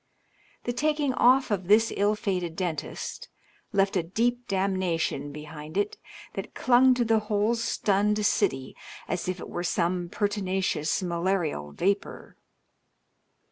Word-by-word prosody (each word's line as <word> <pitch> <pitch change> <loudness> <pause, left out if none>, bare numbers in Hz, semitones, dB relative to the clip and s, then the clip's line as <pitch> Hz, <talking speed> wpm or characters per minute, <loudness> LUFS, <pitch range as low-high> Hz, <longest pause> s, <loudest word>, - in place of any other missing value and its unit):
The 240 - -2
taking 295 0 +1
off 255 0 +4
of 190 -3 -1
this 220 +3 +4
ill 205 +1 +2
fated 180 -6 -2
dentist 175 -4 -4 0.4
left 195 -1 +2
a 180 - +3
deep 240 +8 -1
damnation 185 -7 -1
behind 150 +2 -8
it 205 +1 0 0.4
that - - -6
clung 255 +1 +5
to 245 -1 +1
the 225 -1 +3
whole 210 +2 +2
stunned 210 -2 +1
city 130 -9 +1 0.3
as - - -2
if 185 0 -3
it - - -7
were 175 - -4
some 175 0 0
pertinacious 190 -5 -1
malarial 170 - -1
vapor. 200 - -2
195 Hz, 130 wpm, -27 LUFS, 175-220 Hz, 0.4 s, clung